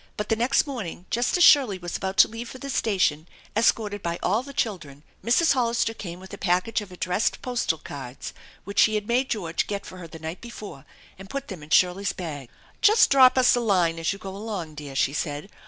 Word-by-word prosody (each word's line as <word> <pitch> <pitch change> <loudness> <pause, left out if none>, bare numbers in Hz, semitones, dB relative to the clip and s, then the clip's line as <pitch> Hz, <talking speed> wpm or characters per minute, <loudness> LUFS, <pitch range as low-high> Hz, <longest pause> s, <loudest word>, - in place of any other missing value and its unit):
But 210 - -4
the 225 - +3
next 245 +4 +2
morning 215 - -6
just 240 +8 +1
as 355 - +4
Shirley 260 - +6
was 175 -1 -6
about 190 +1 -3
to - - +8
leave 230 +1 -7
for - - -9
the 275 +1 -6
station, 185 - 0 0.3
escorted 210 -2 +1
by 170 -1 -2
all 210 +6 +2
the 280 +2 -10
children, 155 - -4 0.2
Mrs. 290 +8 +3
Hollister 235 -3 0
came 175 -5 -8
with 190 0 -12
a - - -8
package 185 +5 0
of 200 -3 -10
addressed 180 +4 -1
postal 245 -10 -1
cards 135 -4 -8 0.3
which 200 0 -3
she 215 - +5
had 210 0 -2
made 250 +3 +1
George 175 -7 -2
get 200 -1 -4
for 185 - -10
her 170 - -8
the 165 - -11
night 160 +3 -7
before, 215 - -10 0.3
and 195 0 -11
put 275 0 -5
them 185 -6 -7
in 150 - -12
Shirley's 185 +4 +2
bag. 145 -8 -7 0.3
"Just 435 +2 +5
drop 260 -1 +6
us 255 0 +5
a - - +1
line 180 -7 +1
as 165 - 0
you 200 - -5
go 195 -2 -8
along, 200 -7 -5
dear," 145 -2 -9
she 135 +1 +1
said. 150 +5 -4
200 Hz, 220 wpm, -25 LUFS, 170-235 Hz, 0.3 s, to